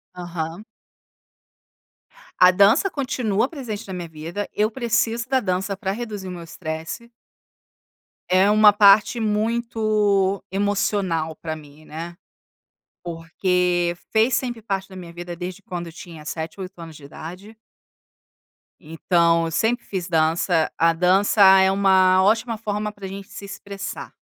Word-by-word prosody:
Aham. 175 +1 -5 1.7
A 180 0 +7
dança 200 - +4
continua 250 - -1
presente 235 -10 -7
na 190 - -6
minha 175 -2 -6
vida, 165 +6 -6
eu 215 +1 +1
preciso 235 0 -1
da 265 - +3
dança 195 -2 -2
para 190 0 -2
reduzir 210 -5 -6
meu 175 -2 -7
estresse. 160 +7 -6 1.2
É 190 +2 +4
uma 210 -1 +6
parte 205 +3 +5
muito 215 -3 0
emocional 195 -5 -1
para 160 0 -5
mim, 150 0 -15
né, 170 +3 -8 0.9
porque 175 +1 0 0.2
fez 225 +3 +3
sempre 240 -2 -2
parte 195 -3 -3
da 190 - -12
minha 175 -2 -9
vida 175 0 -7
desde 180 +3 -7
quando 175 -3 -6
tinha 165 -3 -11
7, 160 +4 -5
8 185 0 -8
anos 165 -2 -10
de 145 - -14
idade. 180 +9 -10 1.2
Então 165 +1 +1
eu 165 - -4
sempre 230 +8 0
fiz 185 -3 -4
dança, 165 0 +1
a 165 0 +4
dança 190 +5 +2 0.2
é 190 0 +4
uma 190 -1 +4
ótima 225 +2 +1
forma 210 -1 -3
para 205 -2 -11
a - - -4
gente 195 0 -8
se 200 - -9
expressar. 200 0 -8
190 Hz, 135 wpm, -22 LUFS, 170-210 Hz, 1.7 s, A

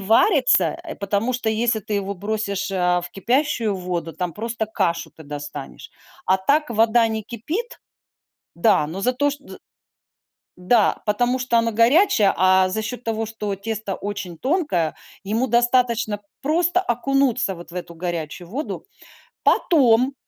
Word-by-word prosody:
варится, 225 - +4 0.2
потому, 200 +4 0
э, 255 - -2
что 245 -2 -2
если 220 +1 +1
ты 210 - -4
его 200 0 -1
бросишь, 205 0 -2
э, 180 -2 +1
в 175 - -7
кипящую 235 - 0
воду, 180 -3 -4
там 180 -2 -4
просто 225 0 -3
кашу 170 -5 -1
ты 160 - -14
достанешь. 145 -1 -8 0.4
А 190 - +4
так 285 +11 +1
вода 230 0 +3
не 220 -1 -3
кипит, 305 - -5 0.8
да, 170 -5 +3
но 180 +5 -5
зато 255 +5 +1
шт 285 0 -7
з - - -10 1.0
Да, 205 +4 +2
потому 245 +5 +1
что 245 -2 +2
оно 230 0 +1
горячее, 230 - +4
а 185 0 +4
за 220 +4 -2
счет 245 +2 -5
того, 225 0 -2
что 210 -2 -4
тесто 215 -1 -4
очень 195 -4 -6
тонкое, 255 - 0 0.3
ему 225 +6 0
достаточно 235 -3 +2 0.2
просто 340 +5 +2
окунуться 250 - +1
вот 170 0 -12
в - - -11
эту 175 -2 -7
горячую 170 0 -4
воду. 275 - -5 0.6
Потом 260 -4 +4
220 Hz, 150 wpm, -22 LUFS, 190-245 Hz, 1.0 s, варится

